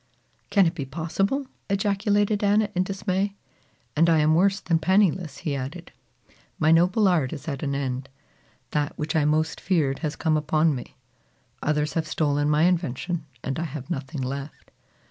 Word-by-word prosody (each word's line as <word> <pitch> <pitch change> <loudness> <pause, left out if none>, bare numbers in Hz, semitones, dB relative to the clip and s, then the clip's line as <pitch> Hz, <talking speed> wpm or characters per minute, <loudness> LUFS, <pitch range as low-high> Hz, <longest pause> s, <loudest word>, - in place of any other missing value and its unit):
"Can 200 -3 +5
it 165 - +1
be 160 -5 -4
possible?" 170 - -1 0.2
ejaculated 205 +1 +1
Anna 205 +1 +3
in 180 - +1
dismay. 195 +1 -1 0.6
"And 165 +3 +4
I 165 - +5
am 155 0 +4
worse 195 +4 +3
than 165 -4 +1
penniless," 180 -4 +2
he 145 -3 0
added. 140 +6 -6 0.7
"My 155 0 +3
noble 180 +6 +4
art 160 -8 +2
is 145 -1 -8
at 140 -3 -3
an 140 -2 -1
end. 135 -1 -3 0.6
That 150 -1 -1
which 150 +1 -3
I 155 -2 +3
most 155 +1 +1
feared 150 -8 +1
has 155 -3 -3
come 155 0 +1
upon 155 +1 +2
me. 125 -3 -7 0.7
Others 150 0 0
have 160 -2 -1
stolen 145 -1 +1
my 150 +1 +3
invention 170 -1 0 0.2
and 135 +3 -2
I 170 - -1
have 150 +1 -7
nothing 135 -2 -4
left." 140 +3 -6
160 Hz, 165 wpm, -25 LUFS, 145-185 Hz, 0.7 s, Can